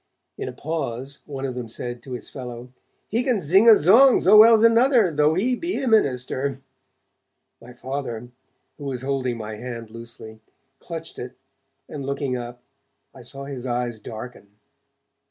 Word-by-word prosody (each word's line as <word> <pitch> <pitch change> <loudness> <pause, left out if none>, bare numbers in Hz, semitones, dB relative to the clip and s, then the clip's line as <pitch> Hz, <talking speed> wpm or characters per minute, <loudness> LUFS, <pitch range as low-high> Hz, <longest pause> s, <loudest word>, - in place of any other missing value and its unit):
In - - -5
a - - -6
pause, 140 -4 -5
one 135 -2 -5
of 130 - -3
them 125 -2 -6
said 120 +2 -6
to 130 - -9
his 125 - -6
fellow: 125 -2 -8 0.4
'He 230 +3 +1
can 250 -5 +1
zing 190 +8 +5
a - - +11
zong, 230 - +6
zo 195 +4 +5
well's 220 +1 +8
another, 230 -3 +5
though 150 +1 +2
he 240 +8 +1
be 340 +8 -3
a 265 - -2
minister.' 135 - +1 1.0
My 120 +1 -13
Father, 120 -2 -5 0.5
who 145 - -7
was 130 -2 -4
holding 130 -3 -1
my 110 -1 -6
hand 115 -2 -7
loosely, 115 -1 -10 0.4
clutched 165 -1 -8
it, 125 +1 -7 0.5
and 145 -2 -7
looking 140 -1 -2
up, 120 0 -7 0.5
I - - -13
saw 140 0 -9
his 130 -2 -6
eyes 120 -2 -2
darken. 110 -2 -10
135 Hz, 160 wpm, -23 LUFS, 120-175 Hz, 1.0 s, a